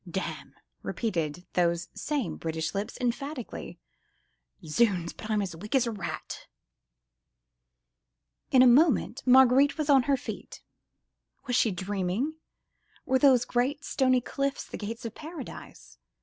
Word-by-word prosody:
"Damn!" 190 Hz, +2 st, -5 dB, 0.3 s
repeated 175 Hz, -6 st, -3 dB
those 170 Hz, -1 st, +1 dB
same 290 Hz, -5 st, -2 dB
British 160 Hz, -1 st, -3 dB
lips, 200 Hz, +1 st, -4 dB
emphatically. 255 Hz, +1 st, -4 dB, 0.9 s
"Zounds! 175 Hz, 0 st, +1 dB
but 220 Hz, -, -9 dB
I'm 210 Hz, -2 st, +1 dB
as 180 Hz, -4 st, -5 dB
weak 210 Hz, +9 st, -5 dB
as 260 Hz, -2 st, +4 dB
a 235 Hz, -, -2 dB
rat!" 205 Hz, -4 st, -6 dB, 2.0 s
In 255 Hz, -1 st, +6 dB
a -, -, +7 dB
moment 260 Hz, 0 st, +4 dB
Marguerite 265 Hz, +2 st, +6 dB
was 305 Hz, -2 st, +1 dB
on 270 Hz, -2 st, +7 dB
her 275 Hz, -, +4 dB
feet. -, -, -8 dB, 0.8 s
Was 245 Hz, -2 st, -1 dB
she 230 Hz, -, +4 dB
dreaming? 195 Hz, -, -2 dB, 0.7 s
Were 260 Hz, 0 st, +2 dB
those 260 Hz, -4 st, +5 dB
great, 270 Hz, +5 st, -1 dB
stony 255 Hz, -2 st, +2 dB
cliffs 275 Hz, +2 st, -2 dB
the -, -, -8 dB
gates 225 Hz, +2 st, -6 dB
of 225 Hz, -, -5 dB
paradise? 315 Hz, -1 st, -10 dB
240 Hz, 130 wpm, -28 LUFS, 195-270 Hz, 2.0 s, a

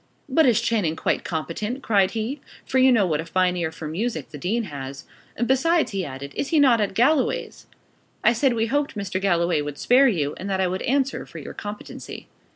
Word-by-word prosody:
'But 285 Hz, +2 st, +4 dB
is 235 Hz, -4 st, +4 dB
Channing 195 Hz, -9 st, 0 dB
quite -, -, -1 dB
competent?' 210 Hz, -, -4 dB
cried 200 Hz, -4 st, +3 dB
he 250 Hz, +6 st, -3 dB, 0.2 s
for 260 Hz, -, +1 dB
you 260 Hz, 0 st, +6 dB
know 220 Hz, -5 st, +4 dB
what 160 Hz, -3 st, 0 dB
a -, -, -8 dB
fine 180 Hz, +1 st, +1 dB
ear 170 Hz, -2 st, -2 dB
for 160 Hz, -1 st, -7 dB
music 165 Hz, -, -3 dB
the 155 Hz, -, -9 dB
dean 220 Hz, +9 st, -1 dB
has: 135 Hz, -6 st, -7 dB, 0.4 s
'besides,' 315 Hz, +5 st, +2 dB
he 195 Hz, -2 st, -2 dB
added, 140 Hz, -1 st, -7 dB
'is -, -, -2 dB
he 320 Hz, 0 st, +2 dB
not 250 Hz, -6 st, +5 dB
at 200 Hz, -2 st, -1 dB
Galloway's?' 265 Hz, +5 st, +1 dB, 0.6 s
I 235 Hz, -, +5 dB
said 250 Hz, +2 st, +2 dB
we 225 Hz, 0 st, +1 dB
hoped 285 Hz, +4 st, -1 dB
Mr. 195 Hz, -2 st, -3 dB
Galloway 175 Hz, -4 st, +2 dB
would 145 Hz, -1 st, -5 dB
spare 265 Hz, +3 st, +5 dB
you, 155 Hz, -, 0 dB
and 195 Hz, -, -6 dB
that 190 Hz, -1 st, 0 dB
I 190 Hz, -, +2 dB
would 185 Hz, +1 st, -2 dB
answer 270 Hz, +1 st, 0 dB
for -, -, -11 dB
your -, -, -8 dB
competency. 210 Hz, 0 st, -8 dB
205 Hz, 210 wpm, -23 LUFS, 165-255 Hz, 0.6 s, you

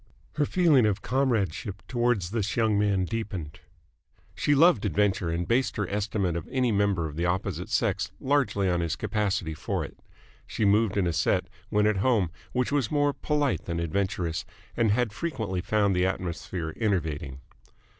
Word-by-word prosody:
Her 145 Hz, -2 st, +2 dB
feeling 155 Hz, -11 st, +4 dB
of 100 Hz, -2 st, -1 dB
comradeship 115 Hz, -, -1 dB
towards 120 Hz, -7 st, 0 dB
this 105 Hz, -3 st, -1 dB
young 110 Hz, -2 st, +3 dB
man 100 Hz, -3 st, +2 dB
deepened. 100 Hz, -8 st, -5 dB, 0.7 s
She 145 Hz, -, +2 dB
loved 165 Hz, -, +5 dB
adventure 100 Hz, -4 st, +1 dB
and 85 Hz, +1 st, -2 dB
based 125 Hz, +3 st, +1 dB
her 105 Hz, -3 st, -1 dB
estimate 100 Hz, -3 st, -1 dB
of 85 Hz, -, -4 dB
any 130 Hz, -2 st, +1 dB
member 100 Hz, -5 st, +1 dB
of 75 Hz, -, -8 dB
the 85 Hz, +1 st, +1 dB
opposite 90 Hz, +2 st, -2 dB
sex -, -, 0 dB
largely 125 Hz, -8 st, +1 dB
on 90 Hz, -1 st, +1 dB
his 85 Hz, -2 st, -1 dB
capacity 100 Hz, -6 st, -1 dB
for -, -, -3 dB
it. -, -, -13 dB, 0.5 s
She 110 Hz, -, -1 dB
moved 105 Hz, 0 st, +3 dB
in 100 Hz, -, +2 dB
a 85 Hz, -, 0 dB
set, -, -, +1 dB, 0.2 s
when 105 Hz, 0 st, +2 dB
at 105 Hz, -1 st, +2 dB
home, 100 Hz, -5 st, +2 dB, 0.2 s
which 125 Hz, +1 st, 0 dB
was 140 Hz, -6 st, +1 dB
more 145 Hz, -1 st, +2 dB
polite 145 Hz, -3 st, -1 dB
than 85 Hz, -1 st, -2 dB
adventurous, 90 Hz, 0 st, -1 dB, 0.3 s
and 115 Hz, -2 st, +2 dB
had 110 Hz, 0 st, +1 dB
frequently 110 Hz, -, -3 dB
found 100 Hz, +1 st, +1 dB
the 90 Hz, +1 st, +2 dB
atmosphere 85 Hz, -2 st, -4 dB
enervating. 80 Hz, -, -2 dB
100 Hz, 165 wpm, -27 LUFS, 90-120 Hz, 0.7 s, loved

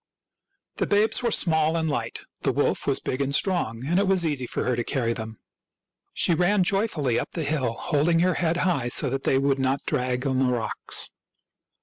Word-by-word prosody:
The -, -, 0 dB
babes 210 Hz, +3 st, +2 dB
were 240 Hz, -, +1 dB
small 160 Hz, -5 st, +2 dB
and 160 Hz, -1 st, 0 dB
light; 145 Hz, -, -3 dB, 0.2 s
the -, -, +1 dB
wolf -, -, 0 dB
was -, -, +2 dB
big 130 Hz, -, -3 dB
and 140 Hz, 0 st, +1 dB
strong, 130 Hz, -, -1 dB
and 175 Hz, +6 st, +2 dB
it 200 Hz, -, +1 dB
was 190 Hz, -3 st, +3 dB
easy 140 Hz, -5 st, -1 dB
for -, -, -3 dB
her 125 Hz, -, 0 dB
to 120 Hz, -, -1 dB
carry 115 Hz, -2 st, -1 dB
them. 110 Hz, -1 st, -7 dB, 0.7 s
She 175 Hz, -, +2 dB
ran 180 Hz, +4 st, +3 dB
joyfully 175 Hz, -, 0 dB
up -, -, -4 dB
the 165 Hz, -, -2 dB
hill, 140 Hz, -5 st, 0 dB
holding 150 Hz, +7 st, +1 dB
her 180 Hz, +1 st, +3 dB
head 170 Hz, -1 st, 0 dB
high 140 Hz, -10 st, +1 dB
so 125 Hz, +2 st, +1 dB
that 135 Hz, 0 st, -2 dB
they 135 Hz, -, +3 dB
would 135 Hz, 0 st, +1 dB
not 135 Hz, +1 st, 0 dB
drag 125 Hz, +1 st, -1 dB
on 130 Hz, -1 st, +1 dB
the 135 Hz, -, +3 dB
rocks. 120 Hz, -3 st, -2 dB
145 Hz, 205 wpm, -25 LUFS, 130-175 Hz, 0.7 s, was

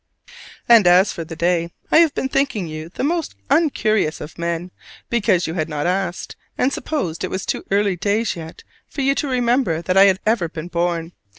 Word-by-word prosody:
And 230 Hz, -6 st, +7 dB
as 180 Hz, +3 st, +5 dB
for 170 Hz, -, -5 dB
the 165 Hz, 0 st, -8 dB
day: 170 Hz, 0 st, 0 dB, 0.2 s
I -, -, +7 dB
have 330 Hz, -3 st, +4 dB
been 265 Hz, -, -1 dB
thinking 275 Hz, -8 st, 0 dB
you 155 Hz, +1 st, -7 dB
the 185 Hz, -, -5 dB
most 325 Hz, -, -1 dB, 0.2 s
uncurious 215 Hz, -, +2 dB
of 150 Hz, +3 st, -10 dB
men, 170 Hz, +1 st, -3 dB, 0.4 s
because 205 Hz, -6 st, +2 dB
you 160 Hz, -, -3 dB
had 160 Hz, -2 st, -2 dB
not 150 Hz, -1 st, -3 dB
asked: 180 Hz, 0 st, -2 dB, 0.2 s
and 265 Hz, +2 st, +1 dB
supposed 180 Hz, -, -3 dB
it 185 Hz, -, -2 dB
was 190 Hz, 0 st, -4 dB
too -, -, -2 dB
early 200 Hz, -2 st, +1 dB
days 210 Hz, +5 st, 0 dB
yet 165 Hz, -1 st, -10 dB, 0.2 s
for 280 Hz, -, -5 dB
you 275 Hz, +1 st, +3 dB
to 285 Hz, -, -2 dB
remember 245 Hz, -8 st, +1 dB
that 185 Hz, +2 st, 0 dB
I 195 Hz, -, +8 dB
had 190 Hz, -1 st, +3 dB
ever 215 Hz, -6 st, +1 dB
been 165 Hz, +1 st, -7 dB
born. 170 Hz, -1 st, -1 dB
185 Hz, 200 wpm, -20 LUFS, 170-235 Hz, 0.4 s, I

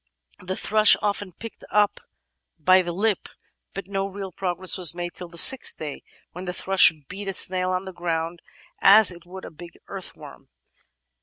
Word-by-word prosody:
The 185 Hz, +1 st, -5 dB
thrush 215 Hz, +1 st, +4 dB
often 205 Hz, -2 st, -2 dB
picked 230 Hz, +5 st, -11 dB
one 210 Hz, -, +3 dB
up 205 Hz, -1 st, +1 dB, 0.6 s
by 185 Hz, +4 st, +5 dB
the 175 Hz, -1 st, -4 dB
lip, 205 Hz, +3 st, 0 dB, 0.5 s
but 195 Hz, -1 st, -6 dB
no 195 Hz, 0 st, -2 dB
real 195 Hz, -1 st, -7 dB
progress 185 Hz, 0 st, -2 dB
was 175 Hz, -3 st, 0 dB
made 175 Hz, 0 st, -5 dB
till 180 Hz, -, -9 dB
the 170 Hz, 0 st, -12 dB
sixth 265 Hz, +8 st, +4 dB
day, 150 Hz, -3 st, -7 dB, 0.3 s
when 180 Hz, +2 st, -8 dB
the 180 Hz, -, -4 dB
thrush 190 Hz, 0 st, +5 dB, 0.2 s
beat 200 Hz, +2 st, -8 dB
a 195 Hz, -, -2 dB
snail 185 Hz, 0 st, +1 dB
on 185 Hz, +1 st, -2 dB
the 190 Hz, -, -8 dB
ground 170 Hz, -1 st, -3 dB, 0.4 s
as 205 Hz, 0 st, +7 dB
it 175 Hz, 0 st, -13 dB
would 190 Hz, +1 st, -9 dB
a -, -, -9 dB
big 170 Hz, +2 st, -13 dB
earthworm. -, -, -10 dB
185 Hz, 180 wpm, -24 LUFS, 175-195 Hz, 0.6 s, as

